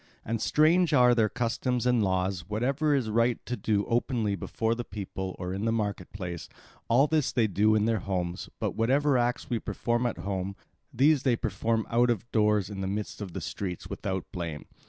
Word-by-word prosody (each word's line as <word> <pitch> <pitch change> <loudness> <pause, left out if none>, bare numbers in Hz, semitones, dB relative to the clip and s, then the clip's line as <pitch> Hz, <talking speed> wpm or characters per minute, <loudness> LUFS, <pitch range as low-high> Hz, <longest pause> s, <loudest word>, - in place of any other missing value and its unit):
And 115 0 -2
strange 165 +5 +3
are 125 -2 +6
their 110 -3 +3
customs 120 +1 -1
and 125 -2 +3
laws. 95 -2 -1
Whatever 135 +8 +1
it - - +4
is 115 -5 -2
right 115 +1 +2
to 125 - -2
do 105 -4 0
openly 115 -3 0
before 110 +4 -1
the 120 +1 -4
people 95 -3 -5
or 90 0 -4
in 100 +3 -3
the 115 - +2
market 105 -5 -2
place, 90 -4 -6 0.4
all 125 +5 +5
this 155 -2 +1
they 120 -3 +2
do 105 +1 +3
in 105 0 +2
their 115 -1 +1
homes, 90 -2 -3
but - - -1
whatever 135 +5 +2
acts 120 0 0
we 120 -2 -1
perform 120 +2 -1
at 120 - -3
home, 95 0 -3 0.4
these 145 +2 +4
they 130 -4 +2
perform 110 +2 -1
out 120 +1 +3
of 115 -1 -1
doors 105 -3 +2
in 100 -1 -6
the 95 - -2
midst 105 +2 -4
of 95 -4 -6
the - - -4
streets, 90 -3 -5
without 95 -1 -3
blame. 85 -4 -5
110 Hz, 200 wpm, -28 LUFS, 95-120 Hz, 0.4 s, are